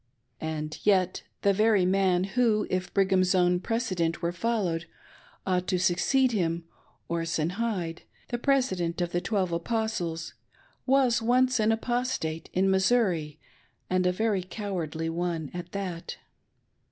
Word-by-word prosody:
And 155 -1 -4
yet 185 -3 +2 0.2
the 200 - +4
very 210 -2 +3
man, 185 -1 +2
who 215 +1 +2
if 185 0 -1
Brigham's 190 -1 +3
own 180 -1 +3
precedent 185 -7 -1
were 170 0 -1
followed, 175 -3 -1 0.6
ought 180 -1 0
to 185 - +1
succeed 190 +9 +2
him 170 -5 0 0.2
— - - -37
Orson 165 -1 -1
Hyde, 190 -6 -2 0.3
the 240 - -2
President 190 -12 +1
of 175 -1 -1
the 175 - 0
Twelve 190 -4 0
Apostles, 175 -3 -2 0.5
was 260 -3 +3
once 250 +2 +3
an 215 +1 +3
Apostate, 225 -9 -2
in 190 +1 +2
Missouri, 190 -7 +2 0.5
and 185 0 +2
a - - +3
very 205 0 0
cowardly 180 -5 -4
one 165 -2 -2
at 175 0 -6
that. 185 -4 -5
185 Hz, 135 wpm, -28 LUFS, 170-220 Hz, 0.6 s, the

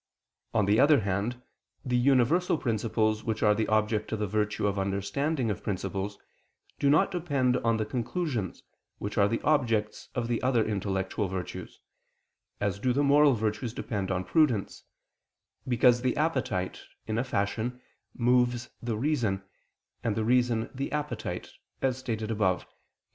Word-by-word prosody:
On 105 -3 +4
the 105 +3 +3
other 145 -2 +6
hand, 105 +6 -2 0.4
the 125 -1 0
universal 140 +8 +3
principles 110 -3 0
which 110 -2 -2
are 105 -1 +5
the 110 +1 -1
object 110 0 +1
of 110 - -1
the 105 - -1
virtue 105 +1 -1
of 100 -1 0
understanding 115 +7 -1
of 100 - -4
principles, 100 0 -3 0.6
do 140 - +3
not 155 +7 +4
depend 140 -8 +1
on 115 -1 +1
the 110 - -1
conclusions, 120 - -3 0.3
which 100 - -5
are 100 - +5
the 115 +2 -1
objects 115 -8 +1
of 120 -2 -1
the 120 -1 -1
other 125 -3 +2
intellectual 100 -1 -1
virtues, 90 -1 -6 0.8
as 100 -1 -1
do 125 +3 +1
the 140 +3 +2
moral 145 -1 +5
virtues 110 +1 -2
depend 100 -4 -3
on 90 -1 -1
prudence, 130 - +1 0.8
because 120 0 +4
the 125 -1 0
appetite, 130 - -1 0.2
in 110 +1 -1
a - - +1
fashion, 120 +1 -2 0.4
moves 120 0 +2
the 115 -2 -2
reason, 115 -8 0 0.6
and 110 -3 0
the 110 0 -1
reason 120 -2 +2
the 135 +1 -4
appetite, 150 0 -3 0.3
as 130 -2 +2
stated 110 -3 -3
above 100 -4 +1
(Q. - - -20
115 Hz, 155 wpm, -28 LUFS, 105-130 Hz, 0.8 s, other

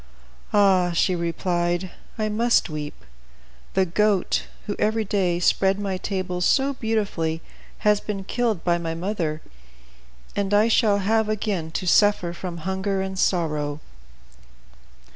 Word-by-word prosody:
"Ah!" 190 -4 +4
she 185 +2 +2
replied, 175 +1 -1 0.3
"I 215 -1 0
must 230 -3 +2
weep. 150 -1 -6 0.7
The 190 0 +4
goat, 200 +2 +1 0.2
who 205 - -3
every 220 +1 +1
day 185 -4 +1
spread 190 +2 +2
my 195 -2 -2
table 185 -2 -3
so 270 +9 +3
beautifully, 200 -9 -1 0.4
has 210 -1 +5
been 200 -2 -5
killed 225 -3 -1
by 175 -1 +2
my 165 -1 -3
mother, 165 -4 -3 0.9
and 205 0 +1
I 215 +2 +4
shall 215 -3 +4
have 215 +2 +1
again 200 -6 -2
to 185 - -2
suffer 185 -2 +3
from 170 -2 -7
hunger 190 0 -1
and 190 0 -5
sorrow." 150 -6 0
190 Hz, 130 wpm, -24 LUFS, 175-210 Hz, 0.9 s, has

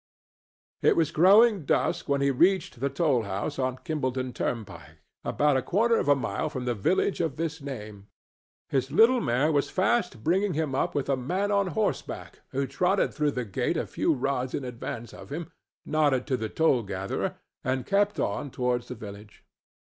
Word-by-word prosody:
It - - +4
was 160 -2 +2
growing 200 +4 +6
dusk 140 - 0
when 140 0 +2
he 140 0 +3
reached 175 -1 +2
the 140 +2 0
toll 145 -6 +2
house 100 +8 -4
on 130 -1 -1
Kimballton 130 -4 -2
turnpike, 85 - -5 0.3
about 145 -2 +2
a - - +1
quarter 225 - +2
of - - -2
a 145 - +6
mile 135 - -2
from 125 -1 -5
the 120 - +1
village 175 - +1
of 160 -5 -1
this 160 0 -3
name. 105 -7 -8 0.6
His 135 -1 0
little 230 - +5
mare 135 - +2
was 145 -2 +1
fast 185 - 0
bringing 185 +2 +1
him 155 -3 -1
up 135 - 0
with 145 - -1
a 140 - +2
man 185 +11 -1
on 200 -1 +2
horseback 165 - -3
who 140 +1 -1
trotted 180 +9 +1
through 150 -2 0
the 125 - -1
gate 100 - -1
a - - -1
few - - 0
rods 130 -1 -1
in 140 - -4
advance 120 -1 -6
of - - -12
him, 160 +2 -5 0.3
nodded 145 -4 +2
to 130 - 0
the 110 -3 -3
toll 150 -4 +2
gatherer 95 -2 -3 0.3
and 130 0 -1
kept 205 +1 +1
on 145 - -1
towards 125 -1 -1
the - - -6
village. 105 0 -11
140 Hz, 185 wpm, -27 LUFS, 125-165 Hz, 0.6 s, growing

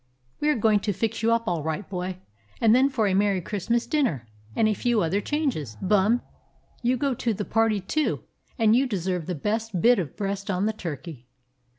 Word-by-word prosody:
"We 300 - +1
are 300 - +3
going 215 -1 +3
to 205 0 -1
fix 225 +3 -2
you 230 +1 +2
up 230 0 +1
all 170 -3 0
right, 160 +6 -3
boy, 180 -1 -4 0.4
and 225 -1 +5
then 260 +3 +5
for 250 -6 0
a 195 - +2
merry 200 0 +2
Christmas 215 +6 -1
dinner, 235 - 0 0.3
and 220 - +3
a 215 - +2
few 230 +1 +1
other 185 +5 0
changes. 220 - -2
Bum, 210 +5 +2 0.6
you 250 +1 +1
go 275 +1 0
to 230 -2 -1
the 205 - -3
party 225 -2 +2
too, 305 +11 -1 0.3
and 225 -2 +4
you 265 +2 +3
deserve 180 -6 -2
the 180 - -2
best 215 +4 -2
bit 240 +4 +5
of 160 -8 -5
breast 200 0 -3
on 190 +1 0
the 220 - 0
turkey." 155 - -7
210 Hz, 205 wpm, -25 LUFS, 185-230 Hz, 0.6 s, and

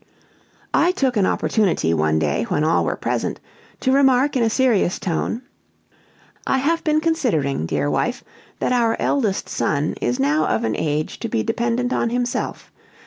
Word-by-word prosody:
I 350 - +4
took 265 -8 0
an 200 -3 +3
opportunity, 185 - +1
one 80 -1 +1
day, 75 +6 0
when 145 - 0
all 160 +1 +2
were - - -1
present, - - -2 0.4
to 260 - +2
remark 270 0 +3
in 255 - +2
a 225 - +3
serious 225 -7 +2
tone: 195 +7 -2 1.0
"I 270 - +2
have 325 +5 0
been 310 0 +2
considering, 185 - 0
dear 75 -2 -1
wife, 75 - -1 0.3
that - - -1
our 230 -2 +2
eldest 220 -9 0
son 150 +1 -1
is 120 +1 -1
now 150 +3 +2
of 110 - 0
an 110 - 0
age 150 0 -2
to - - -4
be 110 - 0
dependent 235 - -1
on 235 - 0
himself. 245 +1 -3
220 Hz, 165 wpm, -21 LUFS, -, 1.0 s, I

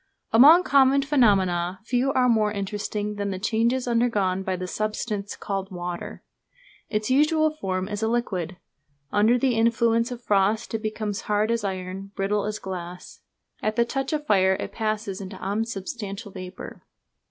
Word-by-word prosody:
Among 300 +10 +8
common 275 -3 +4
phenomena 190 - +2
few 250 +3 +1
are 255 -1 +3
more 215 -3 +3
interesting 210 +1 -3
than 200 0 -2
the 190 - -3
changes 230 +5 0
undergone 215 -6 +1
by 190 -1 -2
the 185 0 -4
substance 210 +1 -3
called 195 -1 -4
water. 175 -2 -6 0.7
Its 215 +2 -1
usual 310 +3 +3
form 190 -11 -3
is 210 0 -4
a 220 - +1
liquid. 190 -7 -2 0.5
Under 220 +4 +4
the 255 0 +2
influence 230 +1 +2
of 245 -1 -7
frost 210 +2 +1
it 225 - -2
becomes 215 -2 -3
hard 210 +2 +2
as 235 -2 0
iron, 190 0 -4
brittle 200 +1 0
as 210 0 -3
glass. 180 -2 -8 0.4
At 215 0 -1
the 235 0 +3
touch 270 +4 -3
of 300 -1 -2
fire 190 -4 +3
it - - -5
passes 215 -3 -3
into 190 0 -7
unsubstantial 205 0 -4
vapour. 185 -1 -9
210 Hz, 155 wpm, -25 LUFS, 195-235 Hz, 0.7 s, Among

